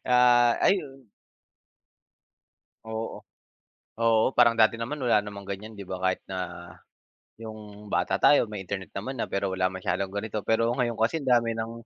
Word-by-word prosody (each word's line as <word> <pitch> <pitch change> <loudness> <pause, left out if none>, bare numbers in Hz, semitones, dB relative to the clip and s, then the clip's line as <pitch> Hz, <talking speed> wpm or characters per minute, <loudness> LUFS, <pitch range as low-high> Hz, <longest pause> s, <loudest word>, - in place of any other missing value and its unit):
Ah, 120 -1 +5
ayun. 135 - 0 1.8
Oo, 110 0 -5 0.8
oo 115 -1 +4
parang 120 -1 +4
dati 110 0 +5
naman 115 +6 -4
wala 120 -6 +2
namang 100 -1 -9
ganyan 100 +2 -7
di 100 - -8
ba 90 0 -5
kahit 95 -1 +1
na, 90 -2 -6 0.7
yung 105 -2 -11
bata 90 +2 +1
tayo 120 +5 +4
may 105 -2 -6
Internet 95 0 -6
naman 125 +6 -5
na - - -1
pero 100 -1 -2
wala 95 0 +1
masyadong 95 +1 -2
ganito 100 +2 -4
pero 115 +1 +2
ngayon 120 -2 -1
kasi 115 +9 0
ang 140 - -8
dami 115 0 -2
ng 115 0 -4
110 Hz, 155 wpm, -26 LUFS, 100-120 Hz, 1.8 s, Ah